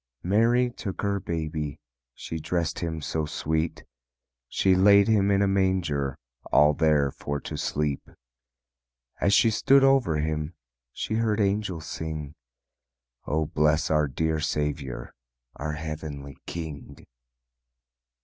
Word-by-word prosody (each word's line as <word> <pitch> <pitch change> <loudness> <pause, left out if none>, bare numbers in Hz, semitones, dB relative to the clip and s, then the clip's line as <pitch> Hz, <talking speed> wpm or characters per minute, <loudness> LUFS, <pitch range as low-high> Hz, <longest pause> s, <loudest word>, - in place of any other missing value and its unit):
Mary 115 +6 +3
took 100 -5 -6
her 100 0 0
baby, 80 -4 -4 0.4
She 80 - -6
dressed 85 +1 -2
Him 80 -3 -3
so 80 0 -2
sweet, 80 +2 -2 0.6
She 95 +8 +2
laid 100 +2 +6
Him 105 -3 +3
in 100 0 +3
a - - +2
manger, 90 -8 0 0.3
All 75 +1 +6
there 75 -3 +2
for 70 +1 -4
to - - -6
sleep. 75 -2 -2 1.1
As 100 - +2
she 115 +2 +5
stood 135 +5 +4
over 135 - +4
Him 75 +1 -2 0.4
She - - -4
heard 110 -1 +1
angels 100 -5 0
sing, 75 -2 -5 0.9
"O 80 +1 +1
bless 75 +1 +1
our 75 -1 +3
dear 80 +4 -1
Saviour, 75 -4 -3 0.4
Our 75 +1 -3
heavenly 75 -3 -6
King." 75 -4 -7
80 Hz, 120 wpm, -26 LUFS, 75-100 Hz, 1.1 s, laid